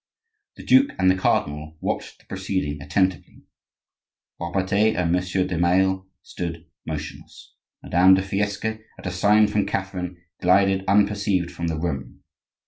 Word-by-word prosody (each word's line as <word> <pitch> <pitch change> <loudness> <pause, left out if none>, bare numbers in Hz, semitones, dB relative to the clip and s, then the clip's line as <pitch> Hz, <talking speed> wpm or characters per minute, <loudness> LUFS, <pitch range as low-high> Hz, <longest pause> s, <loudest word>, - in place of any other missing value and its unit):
The - - -11
duke 265 +2 +5
and 95 0 +4
the - - +1
cardinal 75 -3 -1
watched - - -4
the - - -26
proceeding 95 -7 -3
attentively. 95 +4 -1 1.0
Robertet 95 +5 +1
and 85 -1 0
Monsieur 90 +1 0
de 90 - -3
Maille 95 +2 +2 0.2
stood 85 -1 -6 0.2
motionless. 75 -1 -8 0.3
Madame 95 +2 +5
de 95 - 0
Fiesque, 100 +2 -2 0.3
at - - -13
a 90 - -2
sign 105 +4 +4
from 105 0 0
Catherine, 90 -2 -4 0.2
glided 95 +1 +3
unperceived 100 -2 +2
from 85 - -4
the 80 -1 -2
room. 70 -7 -4
95 Hz, 135 wpm, -23 LUFS, 85-95 Hz, 1.0 s, duke